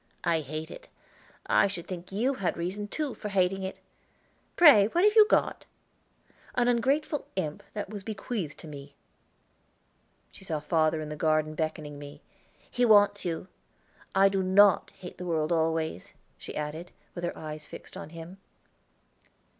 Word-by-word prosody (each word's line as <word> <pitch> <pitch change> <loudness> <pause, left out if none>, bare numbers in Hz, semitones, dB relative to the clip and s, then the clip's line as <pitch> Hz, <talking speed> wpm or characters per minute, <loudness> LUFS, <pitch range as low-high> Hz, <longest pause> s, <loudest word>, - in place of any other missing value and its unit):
I 170 -2 +2
hate 155 +2 -6
it. - - -11 0.6
I - - +4
should 185 -4 -6
think 180 -1 -7
you 235 +8 +1
had 190 - -1
reason, 185 +5 -3
too, 290 +3 -3
for 210 - -6
hating 195 -1 +1
it. 190 0 -5 0.8
Pray 285 -13 +8
what 345 - +1
have 420 +1 +5
you 430 -1 +8
got?" - - +1 0.9
"An 245 -1 +2
ungrateful 275 +5 +1
imp 155 -6 -3
that 210 - -3
was 205 -2 -6
bequeathed 200 -6 -4
to - - -10
me." 140 -1 -10 1.4
She - - -14
saw 160 -5 -2
father 155 +1 +1
in 155 - -6
the 150 - -5
garden 155 0 +1
beckoning 155 -2 -4
me. 145 0 -11 0.5
"He 245 - 0
wants 205 -3 +5
you. 170 +1 -3 0.7
I 195 +1 +6
do 195 -1 0
not 190 +1 +5
hate 180 - -11
the 180 - -5
world 155 -2 0
always," 160 - -1 0.2
she - - -9
added, 150 +4 -4 0.2
with 175 - -7
her 175 - -3
eyes 155 -1 -7
fixed - - -11
on - - -8
him. 170 +3 -10
180 Hz, 160 wpm, -28 LUFS, 155-205 Hz, 1.4 s, Pray